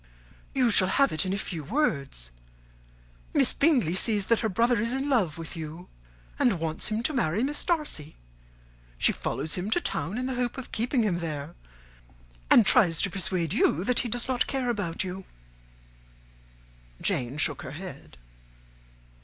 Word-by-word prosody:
"You 255 -3 +3
shall 185 -2 +4
have 275 +8 +3
it 155 +4 +1
in - - -1
a - - -1
few 170 -5 -5
words. 140 - -1 1.0
Miss - - +5
Bingley 265 - +2
sees 205 +1 +1
that 230 +1 +2
her 220 - -1
brother 230 +4 +2
is 235 +2 0
in 270 +2 -2
love 185 - +1
with 165 +1 -7
you 165 +2 -8 0.5
and 210 -9 +2
wants 160 0 0
him 215 +2 -1
to 305 - +2
marry 220 - 0
Miss 290 +2 -2
Darcy. 300 - -2 0.8
She - - +4
follows 140 +6 -2
him 185 +3 -1
to 240 - +2
town 185 - -2
in 255 - -2
the 260 - -2
hope 245 0 -2
of 265 - -8
keeping 240 +2 0
him 180 -5 0
there, 155 -1 -5 1.0
and 230 - +7
tries 185 -9 +5
to 195 - +1
persuade 180 -4 -1
you 165 - +2
that 250 +4 +2
he 240 - -2
does 240 +3 0
not 255 -2 +1
care 260 -3 -1
about 185 -7 -2
you." 190 +1 -6 1.8
Jane 125 +3 -2
shook 145 -2 0
her 130 - -8
head. 155 - -10
195 Hz, 170 wpm, -27 LUFS, 165-245 Hz, 1.8 s, and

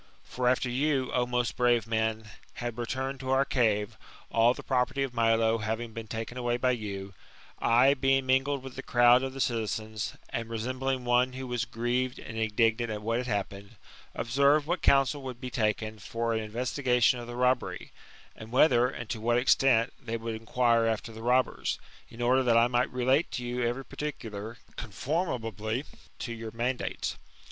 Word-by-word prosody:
For 125 0 -2
after 130 0 +1
you, 130 +1 0
O 125 -1 +1
most 125 -1 -1
brave 120 -3 +3
men, 110 -1 -1 0.3
had 120 -2 -4
recumed 130 +3 -3
to 130 - -6
our 135 +1 +3
cave, 105 -6 0 0.3
all 115 +2 +4
the - - -9
property 130 +1 0
of 135 -2 -4
Milo 115 -1 +2
having 110 +2 -3
been 115 0 -7
taken 115 +3 -5
away 120 -1 0
by 125 +1 +2
you, 100 -4 -5 0.5
I 125 +4 +5
being 135 -1 +2
mingled 135 +1 +1
with 135 -1 -9
the - - -5
crowd 120 +1 +5
of 135 0 -3
the 135 - -8
citizens, 110 -3 -2
and 115 0 -4
resembling 130 +3 -2
one 125 +1 +3
who 130 0 -6
was 120 -1 -2
grieved 125 +3 -1
and 110 - -9
indignant 115 +1 +1
at 105 -1 -5
what 115 +2 0
had 125 - -4
happened, 100 -2 -4 0.4
observed 140 +5 +3
what 175 +4 -1
counsul 135 +1 +3
would 130 -2 -7
be 125 0 -6
taken 110 -1 -1
for 115 +3 -2
an 110 - 0
investigation 125 +2 +1
of 120 - -8
the 120 - -7
robbery, 125 +1 0 0.4
and 110 +1 -11
whether, 125 -2 +5
and 120 -3 -7
to 110 - -4
what 120 +1 +2
extent, 125 -2 +3
they 115 -1 -3
would 115 0 -4
inquire 115 +1 +2
after 110 0 -2
the 110 0 -10
robbers: 125 +2 +1 0.3
in 120 +1 -6
order 130 +2 +4
that 120 -3 +3
I 115 - +6
might 120 +2 +1
relate 130 +5 +2
to 125 - -3
you 120 +1 -3
every 120 +3 -1
particular, 115 -6 -6 0.2
conformably 115 - -2 0.3
to 120 - -5
your 115 -1 -6
mandates. 120 - -2
120 Hz, 180 wpm, -29 LUFS, 115-130 Hz, 0.5 s, I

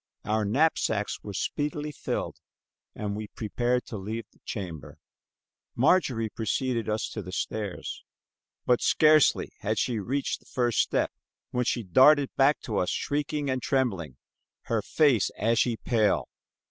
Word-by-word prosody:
Our 110 0 +1
knapsacks 110 -4 +1
were 100 -2 -7
speedily 150 - -2
filled, - - -4 0.6
and 105 -1 -3
we 105 0 -5
prepared 120 +4 -1
to 110 - -6
leave 110 +4 -5
the - - -29
chamber. 85 -9 -6 0.8
Marjorie 125 - +2
preceded 115 +1 -1
us 110 +1 -1
to 110 - -5
the 90 -1 -8
stairs, 100 0 -4 0.6
but 125 -1 +3
scarcely 155 -1 +4
had 110 +1 -1
she 120 -4 0
reached 135 +7 -2
the - - -25
first 120 -2 0
step - - +1 0.4
when 125 0 0
she 120 -1 0
darted 135 - +5
back 140 +2 +3
to 110 -4 -2
us 90 - 0
shrieking 145 0 -2
and 130 -1 -1
trembling, 95 - -1 0.5
her 115 -2 0
face 135 -4 +3
ashy 115 +2 +2
pale. 110 -4 +1
115 Hz, 140 wpm, -27 LUFS, 105-135 Hz, 0.8 s, darted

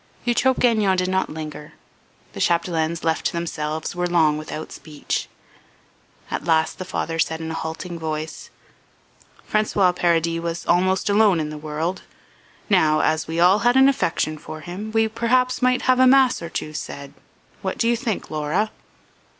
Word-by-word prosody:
Eutrope 250 +2 +2
Gagnon 215 -6 +3
did 180 0 0
not 190 0 0
linger. 150 -1 -8 0.6
The - - -8
Chapdelaines, 170 -1 0
left 160 0 0
to - - -5
themselves, 160 -2 -3
were 175 0 0
long 160 -4 +3
without 155 +1 -6
speech. 150 -2 -5 1.0
At - - -3
last 160 -1 +1
the 185 - -5
father 165 -2 -3
said 160 0 0
in 160 0 -5
a - - -4
halting 165 +2 -5
voice: 155 0 -5 1.0
"François 205 -4 +2
Paradis 165 -1 +1
was 170 0 -4
almost 185 +2 +2
alone 205 -3 +4
in 155 -1 -3
the - - -6
world; 155 +4 -3 0.7
now, 155 -6 +3
as 155 0 0
we 165 +1 -3
all 180 +4 +5
had 245 +3 +3
an 265 0 +7
affection 165 - 0
for 155 0 -9
him, 190 +7 -7
we 225 0 +2
perhaps 250 +3 +1
might 255 0 +2
have 255 0 +3
a 260 - +6
mass 260 -4 +4
or 170 - -6
two 155 -2 -5
said. 140 -2 -7 0.5
What 190 - -3
do 230 - +1
you 235 - +3
think, 230 -3 -3
Laura?" 155 +8 -1
170 Hz, 165 wpm, -22 LUFS, 160-215 Hz, 1.0 s, an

